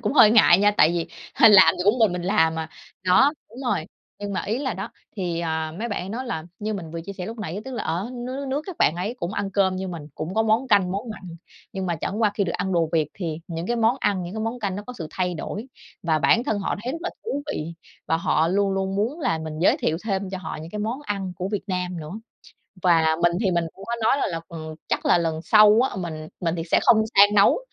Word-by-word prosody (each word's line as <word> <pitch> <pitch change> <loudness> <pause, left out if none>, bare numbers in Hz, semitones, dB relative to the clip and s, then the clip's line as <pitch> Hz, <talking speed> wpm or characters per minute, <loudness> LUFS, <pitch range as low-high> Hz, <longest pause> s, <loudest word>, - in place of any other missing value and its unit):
cũng 225 +1 -1
hơi 235 -7 +7
ngại 210 -5 +6
nha, 205 +1 +4
tại 155 - +6
vì 170 -1 -1 0.3
hơ 225 - +7
làm 200 -3 +8
cũng 215 +5 +3
mình 220 -5 +4
mình 180 -1 -3
làm 160 -4 +2
mà 160 0 -4 0.4
đó, 265 +11 +5 0.2
đúng 235 - -13
rồi. 200 -9 0 0.3
Nhưng 205 -1 -5
mà 185 - -2
ý 220 +5 -2
là 265 -5 -2
đó, 195 +4 -5 0.3
thì, 175 -4 -2
à, 160 -1 -2
mấy 235 +2 -3
bạn 205 - -3
ấy 185 - -7
nói 250 +5 -4
là, 160 -9 -4
như 215 0 -3
mình 170 -5 -6
vừa 165 +1 -5
chia 200 +4 -7
sẻ 180 -2 -6
lúc 230 +3 -7
nãy, 200 -1 -4
tức 265 - -7
là - - -3
ở 180 +8 -2
nước 250 +1 -5
nước 280 0 -4
nước 285 +3 -1
các 375 -4 -7
bạn 155 - +3
ấy 200 +7 -3
cũng 175 +3 -3
ăn 205 -2 -2
cơm 195 -2 +2
như 190 0 -4
mình, 170 -3 -6
cũng 165 +5 -5
có 220 - +3
món 225 +4 +1
canh, 190 -4 +3
món 215 +4 -4
mặn. 215 - -8 0.5
Nhưng 190 -1 -3
mà 170 -2 -1
chẳng 205 +8 -3
qua 210 - +4
khi 200 - +1
được 170 - -2
ăn 190 - -2
đồ 165 -2 +2
Việt 155 -3 +2
thì 165 -5 -4
những 165 +1 -4
cái 240 - 0
món 230 +2 +3
ăn, 190 -3 +1
những 175 +4 -7
cái 220 - -3
món 225 +3 -3
canh 195 -3 -2
nó 205 - -5
có 250 - -6
sự 160 - -4
thay 180 -1 -1
đổi 205 - -5 0.4
và 160 -2 +1
bản 230 - +3
thân 220 -7 0
họ 195 - -2
thấy 255 - -3
rất 330 - -4
là 355 - -2
thú 285 -11 -3
vị. 165 - -4 0.3
Và 160 - +2
họ 165 0 +1
luôn 200 +1 +1
luôn 190 0 -1
muốn 245 +11 -1
là 245 - 0
mình 155 -1 -6
giới 190 - +4
thiệu 195 - 0
thêm 195 -2 -2
cho 190 - -4
họ 175 - -6
những 160 +2 -9
cái 210 - -5
món 225 +5 -2
ăn 195 -7 -3
của 185 +2 -3
Việt 205 -1 -2
Nam 180 -2 -2
nữa. 155 0 -8 0.7
Và 165 -3 +4
mình 175 0 +4
thì 200 -4 +1
mình 170 -1 +1
cũng 195 - -12
có 235 - -3
nói 245 +5 +4
là - - 0
là 165 -2 -3 0.5
chắc - - -1
là - - +5
lần 160 -2 -1
sau 215 +4 +6
á, - - -8
mình 160 -4 -5
mình 170 -1 -1
thì 165 - -3
sẽ - - +5
không 220 - +6 0.2
sang 205 +1 +7
nấu 200 - +5
195 Hz, 275 wpm, -24 LUFS, 170-220 Hz, 0.7 s, làm